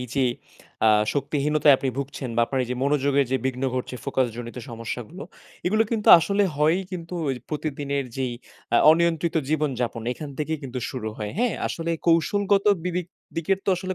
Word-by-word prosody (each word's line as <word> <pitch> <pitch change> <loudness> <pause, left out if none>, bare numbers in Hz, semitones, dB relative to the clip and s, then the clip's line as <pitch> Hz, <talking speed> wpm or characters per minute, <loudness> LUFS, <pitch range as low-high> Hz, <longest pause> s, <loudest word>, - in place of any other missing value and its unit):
এইযে 125 +2 -1 0.6
আ - - +7 0.3
শক্তিহীনতায় 145 +1 +3
আপনি 135 - -2
ভুগছেন 140 -1 -4
বা - - +4
আপনার 135 +1 -1
এইযে 125 +1 -4
মনোযোগের 140 -1 +2
যে 130 - +4
বিঘ্ন 130 0 -3
ঘটছে, 125 0 -3
ফোকাস 130 - +1
জনিত 120 0 -7
সমস্যাগুলো, 120 - -6 0.4
এগুলো 215 +4 +3
কিন্তু 220 -3 0
আসলে 200 +5 +1
হয়েই 155 +5 +3
কিন্তু 170 -1 -6
ওই 135 - +1
প্রতিদিনের 145 -2 -2
যেই 130 -2 -1 0.4
আ - - +7 0.2
অনিয়ন্ত্রিত 170 0 +1
জীবনযাপন, 130 -7 -1
এখান 150 +2 -8
থেকেই 155 +1 -2
কিন্তু 130 -1 -5
শুরু 120 -4 -4
হয়, 105 -1 -4
হ্যাঁ, 245 0 +1
আসলে 165 0 -3 0.2
কৌশলগত 195 +4 +3 0.2
বিবেক 180 -1 -2 0.3
দিকের 185 +4 +1
তো - - -5
আসলে 185 +1 -4
150 Hz, 165 wpm, -24 LUFS, 130-170 Hz, 0.6 s, আ